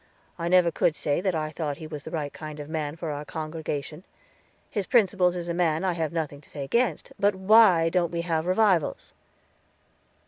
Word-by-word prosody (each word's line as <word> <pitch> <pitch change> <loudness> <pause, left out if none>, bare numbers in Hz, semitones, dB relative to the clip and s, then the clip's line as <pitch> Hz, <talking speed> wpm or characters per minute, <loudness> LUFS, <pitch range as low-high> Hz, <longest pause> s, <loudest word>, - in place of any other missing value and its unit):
I 170 - -2
never 180 -1 +4
could 155 0 +1
say 145 +2 -1
that 185 -2 0
I 155 -1 -2
thought 150 -3 -3
he 160 - -8
was 155 -2 -7
the 160 - -9
right 150 -3 -4
kind 155 -1 -8
of 145 - -7
man 155 -1 -3
for 165 -2 -4
our 145 0 -4
congregation; 155 0 -5 0.6
his 205 -4 -3
principals 190 -6 +3
as 175 -1 -5
a 170 - -1
man 170 -1 +1
I 185 -2 +1
have 160 -3 -2
nothing 155 -4 -4
to - - -21
say 145 - -6
against; 235 - 0
but 200 0 +3
why 190 -3 +5
don't 175 -1 +1
we 170 -1 -2
have 165 -1 -1
revivals?" 185 -4 +1
165 Hz, 200 wpm, -26 LUFS, 155-180 Hz, 0.6 s, why